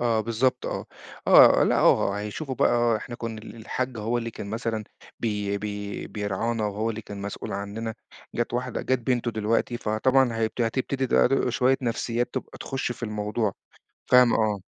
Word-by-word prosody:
آه، 115 -2 +2
بالضبط 115 +3 0
آه، - - -4 0.4
آه - - +8
لأ، - - +2
آه، 100 +1 +3
هيشوفوا 120 +7 -4
بقى 120 -1 +3
إحنا 120 +2 -7
كنا 115 -2 -5
ال 115 - -10
الحاج 125 +2 -3
هو 115 +3 0
اللي 115 -1 -4
كان 105 - -7
مثلًا 110 -1 -2 0.4
بي 105 -3 -1
بي 105 -1 -5
بيرعانا 105 +2 -2
وهو 105 +3 -1
اللي 110 0 -5
كان 100 -1 -8
مسؤول 100 0 -5
عننا، 105 +3 -4 0.4
جَت 120 0 -1
واحدة 125 0 -2
جَت 130 -1 +1
بنتُه 120 0 0
دلوقتي 110 +2 0
فطبعًا 125 +4 +2
هي 115 0 +2
هتبتدي 130 +4 -1
ده - - +4
دو 130 -1 +1
شوية 130 +2 +3
نفسيّات 120 0 -1
تبقى - - -5
تخُشّ 135 -2 -3
في 120 - -15
الموضوع، 105 -1 -1 0.5
فاهمة، 125 -1 +6
آه. 105 -2 +1
115 Hz, 170 wpm, -26 LUFS, 105-120 Hz, 0.5 s, آه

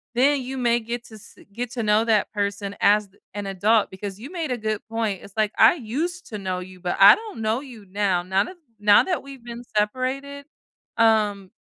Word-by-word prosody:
then 275 +3 +3
you 260 +1 -6
may 240 -2 +2
get 235 +1 -5
to - - -16
get 215 - -11
se - - -16
get 240 +2 -4
to 235 - -2
know 210 +1 +3
that 220 -3 +1
person 200 -1 -2
as 210 0 +4
th 190 - -29
an 205 -1 -4
adult 205 +3 +2
because 195 +1 -7
you 265 +8 -9
made 330 -6 -3
a 250 - -1
good 215 -2 -2
point. 220 -4 -2
It's 200 - -14
like, 215 -1 +2
I - - +7
used 330 +8 -4
to 210 - -5
know 185 -2 -3
you, 185 0 -10
but 175 0 -3
I 195 +1 +10
don't 435 - -9
know 220 +2 +1
you 245 -7 -12
now. 190 -2 0
Now 190 +2 +1
that 375 - -10 0.2
now 205 0 +6
that 360 -3 -2
we've 275 -3 -12
been 235 0 -7 0.2
separated, 260 +6 -2 0.5
um, 210 -4 +2
220 Hz, 220 wpm, -23 LUFS, 200-255 Hz, 0.5 s, I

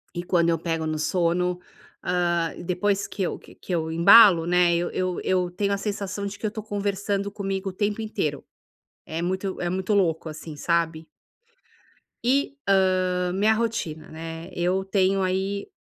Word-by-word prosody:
E 175 - -3
quando 170 -2 +2
eu 165 - +1
pego 165 -2 -2
no 155 0 -2
sono, 180 +2 +1 0.5
hã, 175 -2 0
depois 195 +3 0
que 200 - -6
eu, - - -2
que - - -17
eu - - -28
que - - -8
eu 160 -1 -1
embalo, 170 0 +7
né, 175 -1 +4
eu 175 +1 0
eu 185 -1 -2
eu 180 -1 +1
tenho 200 +2 -1
a - - 0
sensação 200 -1 -4
de 200 +1 -5
que - - -5
eu 210 - 0
tô 220 - -5
conversando 200 -1 -2
comigo 195 -1 -3
o 185 - -8
tempo 210 +2 -1
inteiro, 155 -9 -3 0.6
é 160 +1 -4
muito 190 +2 -2
é 175 - -1
muito 190 +3 -1
louco 165 -5 +1
assim, 155 0 -8
sabe. 165 -1 0 1.2
E, 275 +3 +2
hã, 185 -2 +2
minha 210 +3 +3
rotina, 215 -9 -3
né, 165 +2 -8
eu 180 +2 0
tenho 195 0 +2
aí, 190 +2 -1
185 Hz, 175 wpm, -25 LUFS, 170-200 Hz, 1.2 s, embalo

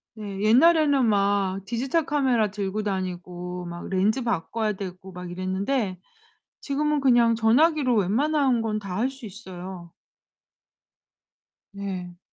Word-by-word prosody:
네. 200 -2 -6
옛날에는 285 +3 +5
막 200 -2 +1
디지털 265 +8 -1
카메라 250 -8 +1
들고 205 0 -3
다니고 180 -2 -4
막 175 0 -7
렌즈 205 +7 +1
바꿔야 220 0 -1
되고 190 -1 -8
막 180 -1 -7
이랬는데 190 +3 -2 0.6
지금은 300 +1 0
그냥 240 -4 +4
전화기로 255 +3 +3
웬만한 260 - +2
건 215 -1 -1
다 190 -3 -5
할 250 +4 +1
수 265 -3 -11
있어요. 185 -4 -9 1.8
네. 185 -3 -6
210 Hz, 245 characters per minute, -25 LUFS, 185-255 Hz, 1.8 s, 옛날에는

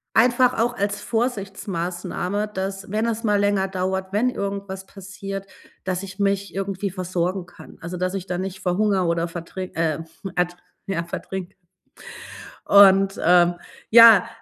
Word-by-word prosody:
einfach 250 +2 +4
auch 240 +1 +1
als 200 0 -1
Vorsichtsmaßnahme, 195 -3 -3
dass, 195 -1 -5
wenn 215 +3 0
es 230 0 -2
mal 210 -1 +3
länger 200 -1 +1
dauert, 190 0 -3
wenn 240 +5 +2
irgendwas 200 -2 -5
passiert, 195 0 -7 0.4
dass 185 0 -2
ich 195 0 -9
mich 200 -2 0
irgendwie 195 0 -3
versorgen 185 0 -2
kann. - - -14
Also, 170 +2 -5
dass 185 +1 -1
ich 190 -2 -4
da 180 -1 -3
nicht 190 0 -5
verhungere 190 +1 +1
oder 170 0 0
vertri 175 +2 -6
äh, 160 -2 0 0.4
ert 175 0 0 0.3
ja, 170 -4 -2
vertrinke. 180 +1 -6 1.1
Und, 195 -1 +6
ähm, 175 0 +5 0.4
ja, 230 -4 +8
195 Hz, 140 wpm, -23 LUFS, 180-200 Hz, 1.1 s, ja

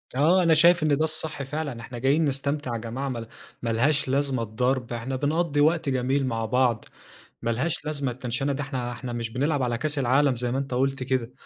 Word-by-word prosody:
آه، 170 +7 +4
أنا 165 -1 +5
شايف 170 +1 +5
إن 150 -2 +3
ده 155 - +1
الصح 155 -2 -1
فعلًا. 145 -3 -4
إحنا 120 +2 -8
جايين 140 +6 +3
نستمتع 140 -1 -1
يا - - -1
جماعة 120 +5 -4
ما 115 -3 -5 0.3
ما 115 - -2
لهاش 140 +6 +2
لازمة 135 -2 0
الضرب. 125 +2 -1
إحنا 120 +3 -3
بنقضّي 150 +2 +1
وقت 160 -1 +2
جميل 130 +2 +1
مع 115 -2 -1
بعض، 120 -1 +1 0.6
ما 115 - 0
لهاش 145 +7 -1
لازمة 145 -4 -2
التَنْشَنة 125 +3 -2
دي، 145 +2 -3
إحنا 130 -3 -4
إحنا 120 +1 -6
مش 115 -1 -3
بنلعب 140 +4 0
على 120 -2 0
كاس 150 +2 -1
العالم 135 +1 +3
زي 120 +1 -2
ما 130 - 0
أنت 135 -2 -3
قُلت 135 +1 0
كده، 130 -2 -1
135 Hz, 210 wpm, -25 LUFS, 120-145 Hz, 0.6 s, أنا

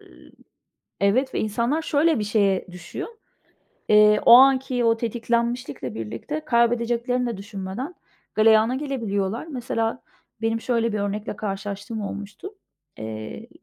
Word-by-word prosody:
ııı, - - -18 0.7
evet 250 +7 +2
ve - - 0
insanlar 235 +9 0
şöyle 310 -1 +2
bir 210 - -1
şeye 200 -3 +1
düşüyor: 180 - -7 0.8
Eee, 210 0 +6
o - - +9
anki 260 -1 +5
o 230 0 +4
tetiklenmişlikle 235 - -2
birlikte 115 - -5
kaybedeceklerini 240 -1 +1
de 235 - -3
düşünmeden, 200 - -6 0.4
galeyana 220 +2 +5
gelebiliyorlar. 230 -5 -2
Mesela, 245 -5 -2 0.4
benim 225 0 0
şöyle 230 -2 0
bir 210 - -1
örnekle 205 +1 -3
karşılaştığım 205 +2 -5
olmuştu. 205 - -7 0.4
Eee, 110 - -7
225 Hz, 120 wpm, -24 LUFS, 205-250 Hz, 0.8 s, o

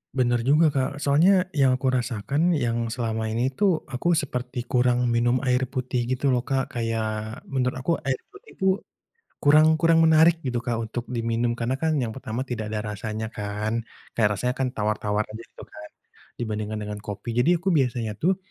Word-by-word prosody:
Bener 120 -2 +2
juga, 150 +2 +4
Kak. 140 +2 -2
Soalnya 180 +6 +4
yang 135 -6 +3
aku 130 0 0
rasakan 130 +7 0
yang 120 -4 0
selama 115 -1 -2
ini 120 +4 0
tuh 180 +3 +1
aku 170 +7 +1
seperti 125 -5 -3
kurang 125 0 +2
minum 120 +2 +2
air 130 0 +1
putih 125 -2 -2
gitu 130 +2 +1
loh, 125 -1 0
Kak. 135 -1 -1
Kayak 110 -2 -3
menurut 130 -2 0
aku 130 +6 -2 0.2
air 135 - +2 0.2
putih 415 +3 -16
itu 190 - -3 0.7
kurang 155 +2 +5
kurang 165 +1 +4
menarik 160 +1 +5
gitu, 125 -3 -1
Kak, 120 -1 -2
untuk 115 +1 -4
diminum. 115 0 -1
Karena 120 +3 -2
kan 160 +1 +1
yang 115 - -2
pertama 120 0 -4
tidak 110 -5 -4
ada 105 0 -3
rasanya 110 +1 -4
kan, 110 +2 -3 0.3
kayak 105 -2 +3
rasanya 125 +5 -1
kan 130 - +1
tawar-tawar 105 0 0
aja 110 +2 -8
gitu - - -14
kan 105 0 -11 0.5
dibandingkan 110 -1 -3
dengan 105 0 -6
kopi, 105 +3 -6
jadi 165 +9 +4
aku 190 0 +1
biasanya 120 -6 0
tuh 180 - +1
125 Hz, 180 wpm, -25 LUFS, 115-140 Hz, 0.7 s, kurang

